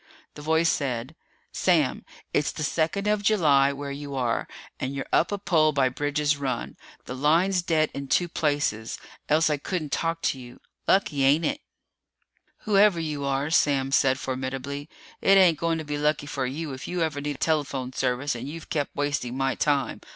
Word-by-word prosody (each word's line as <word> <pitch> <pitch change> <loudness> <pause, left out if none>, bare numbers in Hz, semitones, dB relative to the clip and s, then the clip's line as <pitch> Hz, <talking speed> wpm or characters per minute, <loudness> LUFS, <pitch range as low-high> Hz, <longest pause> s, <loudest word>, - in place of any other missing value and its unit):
The 150 - -10
voice 160 +2 +2
said, 130 0 -2 0.4
"Sam, - - +1 0.3
it's 145 - +1
the 155 - -5
second 165 +6 0
of 210 0 +1
July 150 -10 +4
where 140 0 -6
you 140 0 -6
are, 125 -3 -1 0.3
and 130 +1 -3
you're 135 - -3
up 170 - +3
a 205 - -1
pole 160 -6 +2
by 135 -2 +3
Bridge's 145 +2 0
Run. 130 -4 -3 0.3
The - - -6
line's 170 +7 +2
dead 160 -3 +1
in 140 0 -5
two 175 +6 +2
places, 145 -9 -1 0.3
else 155 +2 +4
I 150 - +1
couldn't 155 0 -4
talk 165 0 -1
to 135 - 0
you. 120 -1 -12 0.3
Lucky, 155 -8 +2
ain't 145 +5 +4
it?" 285 +1 -1 1.0
"Whoever 205 -3 +4
you 150 -3 -3
are," 140 +2 -1
Sam 135 -4 +2
said 130 -1 +3
formidably, 135 +3 -4 0.3
"it 195 0 +5
ain't 175 -5 +5
going 165 -1 0
to 160 - -4
be 145 0 -3
lucky 150 0 +1
for 135 -2 -2
you 145 +2 -4
if 130 - -7
you 175 -1 -1
ever 150 -3 -2
need 145 -1 -4
telephone 140 -5 -1
service 130 +2 0
and 120 +3 -6
you've 165 +3 -9
kept 145 -4 -2
wasting 145 -3 -2
my 135 0 +1
time. 140 -4 0
145 Hz, 180 wpm, -26 LUFS, 135-160 Hz, 1.0 s, it